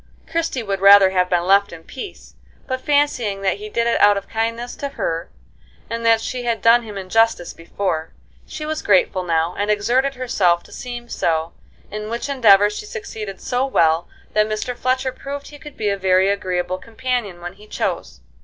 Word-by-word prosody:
Christie 330 -7 -2
would 195 -2 -3
rather 200 -1 +8
have 180 -1 +1
been 175 -1 +1
left 200 +2 +4
in 165 -1 -11
peace; 265 - -9 0.3
but 260 -1 -3
fancying 255 -10 +1
that 190 -1 +1
he 210 +1 -8
did 235 +2 0
it 235 - +1
out 205 0 +6
of 200 - -6
kindness 230 +2 -3
to 280 - -4
her, 165 -11 -3 0.6
and 230 0 -3
that 225 -1 +4
she 250 +2 -4
had 235 -2 -1
done 235 +1 +6
him 215 -3 -8
injustice 195 -1 +1
before, 165 -1 -3 0.4
she 305 0 -6
was 310 0 -3
grateful 190 -1 +3
now, 165 -1 0
and 205 +1 0
exerted 245 +6 +1
herself 185 -9 +1
to - - -18
seem 240 -1 -7
so; 165 -6 -1 0.4
in 210 +1 -5
which 235 +5 -4
endeavor 205 -7 +6
she 420 - -7
succeeded 220 - -7
so 250 +1 -1
well 165 -10 +2 0.3
that 215 0 +2
Mr. 215 +3 -3
Fletcher 260 +1 0
proved 280 +2 -7
he 290 - -12
could 295 -1 -12
be 210 -2 0
a 200 - 0
very 190 0 +3
agreeable 185 -2 -1
companion 230 -4 -3
when 175 +1 -7
he 210 +2 -17
chose. 60 - -4
210 Hz, 190 wpm, -20 LUFS, 190-245 Hz, 0.6 s, rather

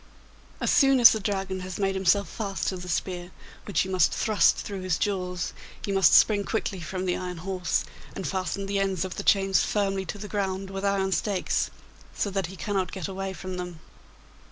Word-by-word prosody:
As - - +1
soon 270 -2 +5
as 235 - +10
the 220 - 0
Dragon 195 -2 -2
has 185 0 -6
made 195 -1 +1
himself 190 +1 +2
fast 200 -3 -3
to 185 - -4
the 180 0 -8
spear, 180 +1 -2 0.4
which 185 -4 +1
you 190 - -5
must 185 -1 +3
thrust 215 -2 +3
through 200 -2 -5
his 185 -4 0
jaws, 180 0 -2 0.3
you 200 - -2
must 195 -4 +6
spring 205 -2 +5
quickly 200 -3 -2
from 185 +3 -4
the 180 - +1
iron 180 -1 -5
horse 180 0 -1 0.3
and 190 - -4
fasten 195 +1 -2
the 200 0 -1
ends 190 -2 0
of 185 - -6
the - - -3
chains 195 -3 +4
firmly 195 -2 0
to 195 - -5
the 210 +1 -7
ground 195 -2 -2
with 195 0 -5
iron 195 -1 +1
stakes, 195 0 0 0.5
so 200 - -1
that 195 -3 -1
he 190 - -10
cannot 190 -2 -2
get 190 -4 -4
away 195 0 -4
from 185 -1 -6
them. 180 -2 -6
190 Hz, 205 wpm, -27 LUFS, 185-200 Hz, 0.5 s, as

